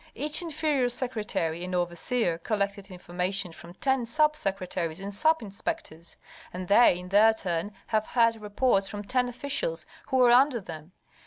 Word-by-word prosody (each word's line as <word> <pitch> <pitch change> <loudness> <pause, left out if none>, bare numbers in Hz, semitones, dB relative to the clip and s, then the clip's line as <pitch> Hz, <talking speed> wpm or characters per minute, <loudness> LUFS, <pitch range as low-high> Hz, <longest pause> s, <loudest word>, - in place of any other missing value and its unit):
Each 300 +3 +1
inferior 305 -6 0
secretary 210 -9 -1
and 180 0 -4
overseer 175 +2 -1
collected 200 0 -2
information 180 +1 -3
from 170 +2 -13
ten 265 +1 0
sub 305 +5 +2
secretaries 185 - -3
and 200 +1 -6
sub 315 +6 +2
inspectors, 200 - -6 0.3
and 180 0 -6
they 205 -2 +5
in 180 0 -9
their 215 +3 +5
turn 180 -1 -3
have 215 -1 -1
heard 230 -2 +3
reports 210 -1 +1
from 205 +1 -6
ten 250 +3 0
officials 285 - -2 0.2
who 260 -2 +3
are 240 - +5
under 255 0 +5
them. 165 -3 -10
205 Hz, 155 wpm, -27 LUFS, 180-250 Hz, 0.3 s, they